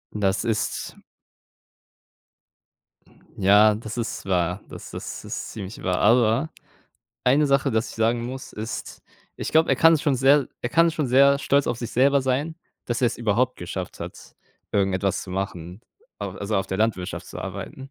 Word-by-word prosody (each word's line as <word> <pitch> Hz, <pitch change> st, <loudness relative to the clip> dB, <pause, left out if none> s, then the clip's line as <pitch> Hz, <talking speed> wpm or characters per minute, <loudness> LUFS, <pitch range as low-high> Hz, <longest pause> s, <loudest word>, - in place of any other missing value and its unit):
Das 100 Hz, -2 st, +1 dB
ist 115 Hz, -2 st, -2 dB, 2.4 s
Ja, 105 Hz, +2 st, +6 dB
das 110 Hz, +2 st, -7 dB
ist 115 Hz, -2 st, -4 dB
wahr, 90 Hz, 0 st, 0 dB
das -, -, -10 dB
ist -, -, -6 dB
ist -, -, -5 dB
ziemlich 100 Hz, -1 st, -7 dB
wahr, 90 Hz, -1 st, 0 dB
aber 120 Hz, +6 st, +3 dB, 0.7 s
eine 140 Hz, +4 st, +4 dB
Sache, 140 Hz, 0 st, +2 dB
das 110 Hz, +1 st, 0 dB
ich -, -, -11 dB
sagen 115 Hz, +1 st, +1 dB
muss, 130 Hz, +2 st, -7 dB
ist 110 Hz, +2 st, -6 dB, 0.3 s
ich -, -, -4 dB
glaube, 160 Hz, +1 st, +4 dB
er 135 Hz, -, +3 dB
kann 165 Hz, +3 st, +6 dB
schon 145 Hz, -1 st, +1 dB
sehr 135 Hz, +1 st, +4 dB
er 120 Hz, -, -2 dB
kann 165 Hz, +6 st, +4 dB
schon 155 Hz, -3 st, -1 dB
sehr 140 Hz, +2 st, +5 dB
stolz 140 Hz, 0 st, +2 dB
auf -, -, -1 dB
sich 120 Hz, -2 st, -5 dB
selber 140 Hz, +2 st, +3 dB
sein, 135 Hz, +5 st, -1 dB, 0.3 s
dass 120 Hz, +1 st, -2 dB
er's 120 Hz, -, +1 dB
überhaupt 120 Hz, +3 st, +1 dB
geschafft 90 Hz, +1 st, -6 dB
hat, -, -, -9 dB, 0.3 s
irgendetwas 95 Hz, -1 st, 0 dB
zu 95 Hz, -, -9 dB
machen, 90 Hz, -1 st, -5 dB, 0.4 s
a -, -, -3 dB
also 100 Hz, +2 st, -3 dB
auf 95 Hz, 0 st, 0 dB
der 95 Hz, -, -3 dB
Landwirtschaft 105 Hz, -5 st, -1 dB
zu -, -, -9 dB
arbeiten. 135 Hz, 0 st, -7 dB
115 Hz, 165 wpm, -24 LUFS, 100-135 Hz, 2.4 s, Ja